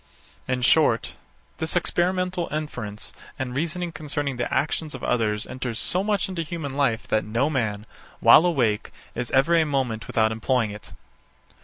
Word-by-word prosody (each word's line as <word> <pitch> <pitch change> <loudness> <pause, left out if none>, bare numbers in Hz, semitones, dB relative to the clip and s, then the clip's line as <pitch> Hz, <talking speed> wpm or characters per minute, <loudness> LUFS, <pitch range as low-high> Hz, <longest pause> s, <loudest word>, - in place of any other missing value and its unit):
In 125 -1 -1
short, - - +3 0.5
this 160 +2 -1
experimental 180 0 0
inference 125 -9 -4 0.2
and 130 -1 -4
reasoning 170 +4 -2
concerning 145 -4 -3
the 120 - -2
actions 155 0 -1
of 130 - -9
others 105 -3 0
enters 125 -3 -4
so 185 +8 0
much 205 -1 +1
into 185 -3 -3
human 160 -3 -5
life 130 -5 +1
that 110 - +2
no 115 +8 0
man, 110 -6 -1 0.3
while 175 - +7
awake, 120 -11 +1 0.2
is 125 0 -4
ever 135 +6 +3
a 165 - +5
moment 130 -7 -1
without 110 -1 +2
employing 115 0 0
it. 105 0 -10
135 Hz, 155 wpm, -24 LUFS, 115-165 Hz, 0.5 s, while